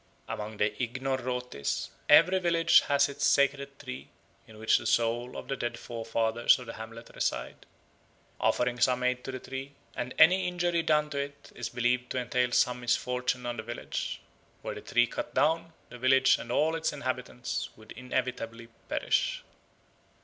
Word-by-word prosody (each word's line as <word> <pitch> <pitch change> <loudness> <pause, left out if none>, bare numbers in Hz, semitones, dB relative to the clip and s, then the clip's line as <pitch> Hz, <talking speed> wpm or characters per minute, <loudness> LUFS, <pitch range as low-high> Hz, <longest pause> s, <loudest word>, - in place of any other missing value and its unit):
Among 105 0 -5
the 105 0 +2
Ignorrotes, 125 - -2 0.2
every 180 +6 +7
village 170 -1 +5
has 140 0 +4
its 140 0 -6
sacred 140 0 +2
tree, 65 - -8 0.4
in 110 - -14
which 110 0 +3
the - - -5
souls 120 +2 +1
of - - -7
the 135 - -1
dead 120 -2 -3
forefathers 115 0 +1
of 125 - -9
the 115 - -7
hamlet 115 +1 -9
reside. 60 - -3 0.7
Offerings 125 0 +2
are 125 -1 +1
made 125 0 0
to 135 - -5
the 130 - -4
tree, 135 +2 -7 0.2
and 125 0 -4
any 180 +4 +6
injury 175 -1 0
done 150 -2 +2
to 140 - -2
it 140 0 -6
is - - -5
believed 120 0 0
to - - -3
entail 125 0 0
some 125 0 +2
misfortune 125 +1 0
on 120 0 -3
the - - -3
village. 120 +1 -4 0.4
Were - - -3
the - - -8
tree 120 0 +3
cut - - -6
down, 165 +1 +2 0.2
the 125 - -10
village 130 +1 +5
and 120 - -7
all 155 +5 +2
its 165 0 0
inhabitants 130 -3 -3
would 110 - -15
inevitably 125 -2 -4 0.2
perish. - - 0
125 Hz, 165 wpm, -29 LUFS, 120-140 Hz, 0.7 s, every